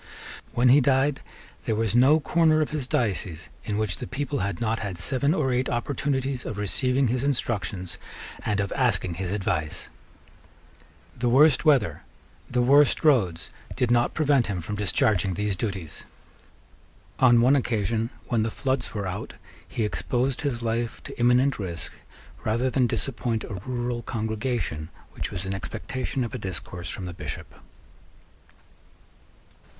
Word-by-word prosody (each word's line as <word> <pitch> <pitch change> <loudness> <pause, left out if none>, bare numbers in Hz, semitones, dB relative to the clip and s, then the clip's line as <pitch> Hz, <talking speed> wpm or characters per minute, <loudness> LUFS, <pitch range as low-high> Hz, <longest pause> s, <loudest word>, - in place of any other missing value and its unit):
When 125 +1 +4
he 140 +4 +7
died 135 +2 +2 0.4
there 110 - +1
was 110 -1 0
no 135 +6 +6
corner 160 0 +3
of 155 - 0
his 145 -4 -3
diocese 90 - -1 0.2
in 105 -2 -2
which 105 -5 -1
the - - -6
people 140 +2 -2
had 100 -3 -2
not 115 -1 0
had 100 -5 -4
seven 130 - +1
or 135 -6 +1
eight 125 +1 0
opportunities 135 +1 -1
of 105 - -5
receiving 125 +6 +1
his 125 +2 0
instructions 100 - -2 0.4
and 105 -1 0
of 100 -1 -1
asking 100 -9 +1
his 90 +1 -4
advice. 80 -6 -2 1.2
The 120 0 0
worst 145 +4 +5
weather, 125 - +3 0.5
the 125 0 +2
worst 140 +3 +5
roads, 100 - +2 0.2
did 120 -1 +1
not 120 0 +2
prevent 145 -5 +3
him 100 -3 -2
from 105 +5 -4
discharging 100 -2 +2
these 105 +1 0
duties. 95 -6 -4 1.2
On 120 -2 +6
one 130 +4 +5
occasion, 115 -3 0 0.2
when 115 -3 +1
the 110 - 0
floods 130 0 -2
were 100 -2 -2
out, 90 -1 -5 0.3
he 115 - -2
exposed 125 +4 -1
his 130 -5 -2
life 115 0 -2
to - - -9
imminent 125 +2 +3
risk 85 -4 -5 0.5
rather 120 +4 +1
than 125 -2 +3
disappoint 120 -2 -2
a - - -6
rural 120 -1 -2
congregation 110 - -2 0.2
which - - -4
was 95 +1 -4
in 95 - -2
expectation 95 +9 -3
of 115 - -5
a 130 - -4
discourse 90 -2 -5
from 95 - -4
the 90 - -5
Bishop. - - -7
120 Hz, 150 wpm, -26 LUFS, 100-130 Hz, 1.2 s, he